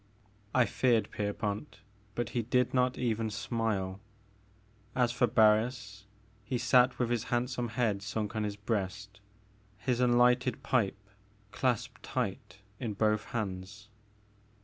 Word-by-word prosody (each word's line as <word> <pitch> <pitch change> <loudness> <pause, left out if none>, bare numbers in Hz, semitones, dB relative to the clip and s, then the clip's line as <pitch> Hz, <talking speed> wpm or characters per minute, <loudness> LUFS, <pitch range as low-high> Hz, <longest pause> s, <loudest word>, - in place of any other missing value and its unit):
I 125 -2 +5
feared 115 0 +1
Pierpont, 105 +4 -3 0.3
but 120 -1 -2
he 120 0 -1
did 125 +2 +1
not 125 0 +2
even 115 -2 0
smile. 100 -3 -2 1.0
As 125 -2 +3
for 125 0 +2
Barris, 110 -2 +2 0.4
he 125 +4 -2
sat 125 +1 +4
with 120 -1 0
his 120 0 0
handsome 125 0 -1
head 115 -3 0
sunk 105 0 -3
on 110 - 0
his 105 -1 -2
breast, 100 -1 -3 0.6
his 125 +2 -1
unlighted 125 0 +3
pipe 110 -6 +1 0.5
clasped 125 -4 -1
tight 95 -5 -4 0.2
in 115 -5 -3
both 105 0 +1
hands. 105 -1 -5
115 Hz, 125 wpm, -31 LUFS, 105-125 Hz, 1.0 s, I